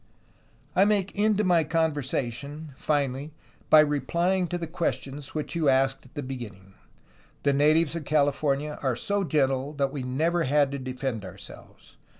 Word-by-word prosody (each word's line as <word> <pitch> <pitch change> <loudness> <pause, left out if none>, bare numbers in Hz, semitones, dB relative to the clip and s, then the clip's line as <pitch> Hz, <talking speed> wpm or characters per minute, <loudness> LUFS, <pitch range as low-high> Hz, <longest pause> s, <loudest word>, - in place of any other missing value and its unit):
"I 190 - +6
make 200 -2 +2
end 210 0 +2
to 210 - +2
my 175 -4 +4
conversation, 145 -2 -2
finally, 140 0 -1 0.4
by 155 - +9
replying 170 +6 +1
to 175 - -2
the 170 - -4
questions 150 -4 -4
which 150 - -3
you 160 -4 +2
asked 135 0 +1
at - - -25
the 145 - -3
beginning. 105 -7 -8 0.7
The 140 - +3
natives 155 +3 +3
of 170 -2 -4
Cali 145 -1 +3
fornia 145 +1 -2
are 130 -3 +1
so 200 - -1
gentle 135 -3 0
that 140 -2 0
we 140 -2 -4
never 160 +7 0
had 145 0 +3
to 140 - -4
defend 130 -3 -4
ourselves. 95 - -12
145 Hz, 160 wpm, -26 LUFS, 135-165 Hz, 0.7 s, by